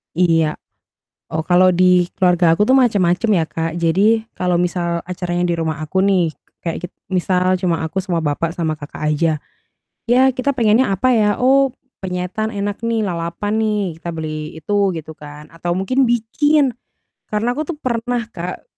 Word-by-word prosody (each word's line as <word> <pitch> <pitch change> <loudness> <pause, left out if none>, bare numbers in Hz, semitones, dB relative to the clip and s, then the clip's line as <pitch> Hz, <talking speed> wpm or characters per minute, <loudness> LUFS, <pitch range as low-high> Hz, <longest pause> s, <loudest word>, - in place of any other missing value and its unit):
Iya. 165 -3 +2 0.7
Oh, 160 - -3
kalau 180 +2 +4
di 180 0 +4
keluarga 175 -2 +3
aku 210 +8 +1
tuh 265 - +6
macem-macem 210 -4 +2
ya, 170 - +3
Kak, 165 0 -2
jadi 215 +7 +2
kalau 180 -1 +1
misal 170 -1 -1
acaranya 175 -1 -3
di 170 - 0
rumah 160 -2 -2
aku 155 +5 -4
nih, 185 -4 +3 0.3
kayak 170 +1 -4
git 180 - -12 0.2
misal 185 0 +1
cuma 175 -3 -1
aku, 160 +4 -4
sama 180 -3 -1
bapak, 160 +2 -1
sama 160 -3 -2
kakak 145 +1 -10
aja. 160 +2 +1 0.7
Ya, 245 +2 +4
kita 270 +2 0
pengennya 230 -2 +3
apa, 240 +7 +1
ya? 210 0 +2
Oh, 270 0 +4 0.3
penyetan 185 +4 -3
enak 205 +1 -4
nih, 230 -1 0
lalapan 175 +5 -3
nih 210 -6 -1
kita 170 +1 -6
beli 155 -1 -5
itu 200 +2 +1
gitu 160 -1 -8
kan, 150 0 -11
atau 165 +1 -4
mungkin 255 +9 +1
bikin, 250 +4 +2 0.5
karena 215 +3 0
aku 300 +4 -4
tuh 345 - -3
pernah, 245 -3 -2
Kak, 175 +2 -6
180 Hz, 165 wpm, -19 LUFS, 165-220 Hz, 0.7 s, tuh